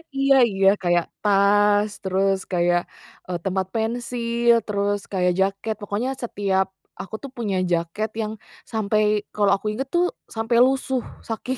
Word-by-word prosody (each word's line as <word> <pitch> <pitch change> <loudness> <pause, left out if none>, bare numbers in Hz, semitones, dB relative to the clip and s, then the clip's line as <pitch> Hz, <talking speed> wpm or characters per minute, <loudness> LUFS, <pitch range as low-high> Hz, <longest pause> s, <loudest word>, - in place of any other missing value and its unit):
Iya 275 0 +4 0.2
iya, 195 0 +2 0.2
kayak 175 -1 +2 0.2
tas, 205 +1 +4
terus 195 +1 +1
kayak, 175 -1 +2 0.5
eee, 180 -1 -2
tempat 190 0 0
pensil, 235 +1 +1
terus 205 -1 0
kayak 180 -2 +2
jaket 195 +3 0
pokoknya 205 +5 -2
setiap 195 -4 0 0.3
aku 195 - -7
tuh 275 - -7
punya 205 -5 -1
jaket 170 +6 -1
yang 215 0 -3 0.4
sampai 215 -1 +1 0.3
kalau 205 -1 +3
aku 200 - -6
inget 265 +5 -3
tuh 350 +1 +4 0.3
sampai 225 +2 0
lusuh, 265 -1 0 0.3
saking 250 +3 -3
205 Hz, 140 wpm, -23 LUFS, 195-235 Hz, 0.5 s, Iya